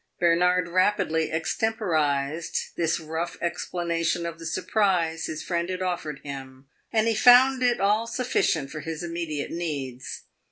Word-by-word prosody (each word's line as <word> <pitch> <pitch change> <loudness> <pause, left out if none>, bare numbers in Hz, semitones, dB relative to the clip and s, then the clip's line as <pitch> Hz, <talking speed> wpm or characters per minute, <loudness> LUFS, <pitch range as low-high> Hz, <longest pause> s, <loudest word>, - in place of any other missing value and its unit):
Bernard 180 +1 +3
rapidly 175 -3 +1
extemporized 160 -5 -1
this 165 0 0
rough 160 +2 -4
explanation 170 0 -1
of 170 -1 -5
the 165 - -6
surprise 175 -2 0
his 155 0 -5
friend 170 0 -1
had 185 0 -2
offered 170 -6 -3
him, 135 -1 -8 0.3
and 220 -1 +2
he 225 - +3
found 250 +4 +6
it 245 -1 +2
all 210 +4 +2
sufficient 165 - 0
for 155 - -5
his 160 +1 -5
immediate 165 -4 -4
needs. 140 -7 -5
170 Hz, 135 wpm, -26 LUFS, 160-185 Hz, 0.3 s, found